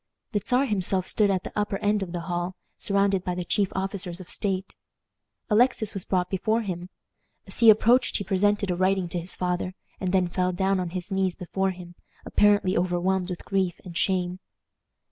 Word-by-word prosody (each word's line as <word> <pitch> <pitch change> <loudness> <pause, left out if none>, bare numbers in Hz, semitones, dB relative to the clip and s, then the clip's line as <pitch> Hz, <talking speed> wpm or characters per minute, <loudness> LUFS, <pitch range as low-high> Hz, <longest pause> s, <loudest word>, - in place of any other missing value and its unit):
The 205 -4 0
Czar 255 +3 +2
himself 190 -5 0
stood 210 -2 +2
at 190 -2 0
the - - -6
upper 205 -1 0
end 205 0 +1
of 185 -3 -4
the 175 -1 -3
hall, 175 +1 -3 0.2
surrounded 200 -2 +1
by 180 -1 -2
the 180 -1 -3
chief 200 +2 +1
officers 190 -2 -3
of 185 - -10
state. 195 -2 -2 0.7
Alexis 230 -1 +2
was 195 - -4
brought 180 -2 +1
before 220 +5 0
him. 180 -3 -5 0.6
As - - -4
he 230 - +8
approached 230 +4 +5
he 200 - -3
presented 200 +1 +1
a - - 0
writing 185 0 +1
to 175 - -2
his 170 +2 -7
father, 180 0 -2 0.2
and 185 -2 -1
then 185 -1 +3
fell 180 +1 0
down 190 +1 +1
on 180 -1 -2
his 185 +3 -5
knees 190 -2 +1
before 190 +1 -1
him, 180 -2 -8 0.3
apparently 205 -2 +3
overwhelmed 180 +1 0
with 180 - -6
grief 190 -3 0
and 175 -2 -9
shame. 180 0 0
190 Hz, 190 wpm, -26 LUFS, 180-200 Hz, 0.7 s, he